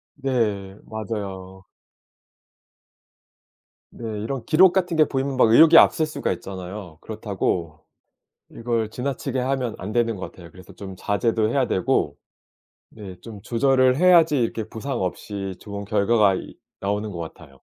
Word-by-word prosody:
네. 110 Hz, -8 st, -2 dB
맞아요. 95 Hz, -4 st, -6 dB, 2.3 s
네. 120 Hz, -, -9 dB, 0.2 s
이런 125 Hz, +3 st, -4 dB
기록 180 Hz, +3 st, +5 dB
같은 180 Hz, -3 st, 0 dB
게 155 Hz, -, +6 dB
보이면 135 Hz, -1 st, -2 dB
막 120 Hz, -, +5 dB
의욕이 160 Hz, +8 st, +8 dB
앞설 160 Hz, -, +6 dB
수가 155 Hz, -, -3 dB
있잖아요. 95 Hz, -2 st, -8 dB
그렇다고 90 Hz, -7 st, -3 dB, 0.7 s
이걸 115 Hz, -2 st, -2 dB
지나치게 130 Hz, +2 st, -3 dB
하면 130 Hz, -2 st, -1 dB
안 100 Hz, +3 st, -6 dB
되는 115 Hz, -2 st, +1 dB
것 95 Hz, -, -6 dB
같아요. 85 Hz, -2 st, -14 dB
그래서 90 Hz, +2 st, -15 dB
좀 95 Hz, +1 st, -8 dB
자제도 110 Hz, +2 st, 0 dB
해야 130 Hz, +2 st, +1 dB
되고 95 Hz, -, 0 dB, 0.7 s
네 95 Hz, -4 st, -10 dB
좀 110 Hz, -4 st, -11 dB
조절을 130 Hz, +3 st, +2 dB
해야지 165 Hz, -3 st, +5 dB
이렇게 115 Hz, -1 st, -1 dB
부상 115 Hz, +4 st, -5 dB
없이 95 Hz, +1 st, -4 dB
좋은 100 Hz, -1 st, -7 dB
결과가 105 Hz, -1 st, +3 dB
이 -, -, -8 dB, 0.2 s
나오는 105 Hz, +2 st, -2 dB
것 85 Hz, -, -7 dB
같아요. 80 Hz, -4 st, -10 dB
110 Hz, 290 characters per minute, -23 LUFS, 95-130 Hz, 2.3 s, 의욕이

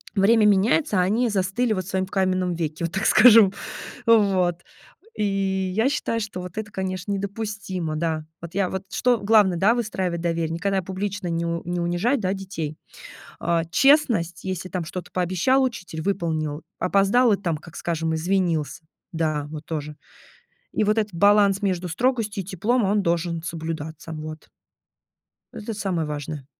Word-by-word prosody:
Время 215 Hz, +2 st, +4 dB
меняется, 205 Hz, +4 st, +3 dB
а -, -, +4 dB
они 225 Hz, +6 st, +1 dB
застыли 205 Hz, +4 st, 0 dB
вот 185 Hz, -3 st, -3 dB
в -, -, -12 dB
своём 190 Hz, -1 st, -1 dB
каменном 185 Hz, -2 st, 0 dB
веке, 160 Hz, 0 st, -3 dB
вот 170 Hz, -, -5 dB
так 195 Hz, -, -1 dB
скажем. 220 Hz, -4 st, +7 dB, 0.5 s
Вот, 195 Hz, -6 st, +4 dB, 0.6 s
и -, -, -1 dB, 0.5 s
я 220 Hz, +4 st, +3 dB
считаю, 285 Hz, -6 st, -1 dB
что 205 Hz, -4 st, -5 dB
вот 180 Hz, +2 st, -9 dB
это, 215 Hz, -1 st, -4 dB
конечно, 185 Hz, 0 st, -4 dB
недопустимо, 195 Hz, -4 st, -3 dB
да. 160 Hz, -1 st, -2 dB, 0.2 s
Вот 170 Hz, 0 st, -9 dB
я, 195 Hz, -2 st, +1 dB
вот 190 Hz, 0 st, -3 dB
что 245 Hz, -2 st, +2 dB
главное, 205 Hz, -3 st, +4 dB
да- 210 Hz, +7 st, +4 dB
выстраивать 190 Hz, -7 st, -2 dB
доверие, 165 Hz, -1 st, -1 dB
никогда 190 Hz, +4 st, -1 dB
публично 190 Hz, +1 st, -4 dB
не 170 Hz, 0 st, -1 dB
у 170 Hz, 0 st, -2 dB
не 175 Hz, 0 st, -2 dB
унижать, 175 Hz, +10 st, +1 dB
да, 190 Hz, -3 st, 0 dB
детей. 185 Hz, -6 st, -5 dB, 0.6 s
А, 170 Hz, -1 st, +1 dB
честность: 215 Hz, -, +3 dB
если 185 Hz, -1 st, -4 dB
там 180 Hz, -3 st, -3 dB
что-то 180 Hz, +2 st, -7 dB
пообещал 185 Hz, +9 st, +2 dB
учитель- 180 Hz, -10 st, -4 dB
выполнил, 160 Hz, -5 st, -2 dB, 0.2 s
опоздал- 200 Hz, +5 st, +3 dB
и -, -, +1 dB
там, 170 Hz, -5 st, -2 dB
как 165 Hz, +2 st, -14 dB
скажем, 165 Hz, -1 st, -2 dB
извинился, 165 Hz, -4 st, -1 dB, 0.3 s
да, 155 Hz, -4 st, -1 dB
вот 155 Hz, -1 st, -7 dB
тоже. 150 Hz, -2 st, -5 dB, 0.8 s
И -, -, +1 dB
вот 210 Hz, +1 st, +2 dB
этот 210 Hz, -3 st, 0 dB
баланс 200 Hz, +2 st, +4 dB
между 185 Hz, -3 st, -1 dB
строгостью 220 Hz, +1 st, -1 dB
и -, -, -16 dB
теплом, 215 Hz, +7 st, 0 dB
он 205 Hz, +1 st, +2 dB
должен 170 Hz, -1 st, -1 dB
соблюдаться, 160 Hz, -1 st, -5 dB
вот. 155 Hz, 0 st, -8 dB, 1.0 s
Это 220 Hz, +1 st, -6 dB
самое 185 Hz, -6 st, -2 dB
важное. 150 Hz, -1 st, -5 dB
185 Hz, 160 wpm, -24 LUFS, 165-205 Hz, 1.0 s, скажем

